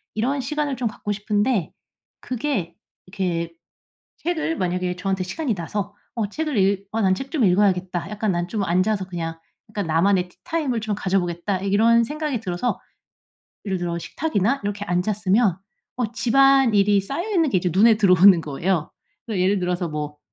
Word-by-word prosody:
이런 260 +6 0
시간을 295 +1 -2
좀 245 -2 -1
갖고 210 - -5
싶은데 210 -2 0 0.5
그게 250 - -3 0.3
이렇게 175 -3 -3 0.6
책을 325 -1 -2
만약에 180 0 -1
저한테 190 0 -1
시간이 225 - -2
나서 200 +4 -4 0.2
어 220 -3 -1
책을 305 +1 -2
읽 195 0 +1
어 225 - -1
'난 190 -2 +3
책 270 +4 -7
좀 280 -9 +2
읽어야겠다.' 185 -2 +1
약간 210 -1 -1
'난 175 0 -1
좀 215 -3 -1
앉아서 190 +2 +1
그냥 165 -3 -5 0.3
그러니까는 205 -5 -4
나만의 180 +3 +2
티타임을 250 - -3
좀 215 -1 -2
가져보겠다.' 185 -1 -1
이런 225 +4 +4
생각이 300 -3 -3
들어서 185 +4 -2 0.9
예를 190 -2 -1
들어 170 -1 -2
식탁이나 225 - -1
이렇게 205 0 -3
앉았으면 195 +2 +1 0.4
어 235 -4 -1
집안일이 235 -6 +4
쌓여 280 - -4
있는 330 -7 +2
게 - - +3
이제 180 - -1
눈에 220 +4 +6
들어오는 185 -3 +6
거예요. 155 +3 -1 0.4
그러니까 185 -4 0
예를 195 +1 +2
들어서 180 -1 -1
뭐 150 -1 -5
200 Hz, 365 characters per minute, -23 LUFS, 180-230 Hz, 0.9 s, 눈에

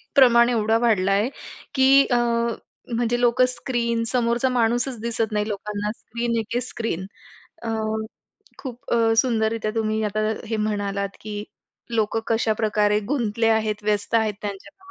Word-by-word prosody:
प्रमाण 235 -3 +6
एवढं 225 -1 +2
वाढलं 210 -5 +2
आहे 205 +5 +2 0.5
की 270 +1 +6
अ, 245 - +4 0.8
म्हणजे 240 +1 0
लोकं 245 +1 +4
स्क्रीन 235 -2 -1
समोरचा 240 +1 +1
माणूसच 240 0 +1
दिसत 230 -1 -1
नाही 210 0 0
लोकांना. 210 0 -3
स्क्रीन 235 0 -3
एके 225 +2 -2
स्क्रीन. 230 -7 -4 0.6
अ, 230 - -3 0.9
खूप 255 0 -8
अ, 230 -1 +3
सुंदररित्या 225 -2 +1
तुम्ही 220 -1 0
आता 210 0 -1 0.3
हे 225 - -1
म्हणालात 200 -2 -2
की 210 -1 -5 0.5
लोकं 225 0 +1
कशाप्रकारे 215 -2 +1
गुंतले 230 -5 +1
आहेत, 215 -1 +1
व्यस्त 210 +1 0
आहेत 220 -2 +2
त्यांच्या 295 - -8
225 Hz, 135 wpm, -23 LUFS, 210-240 Hz, 0.9 s, प्रमाण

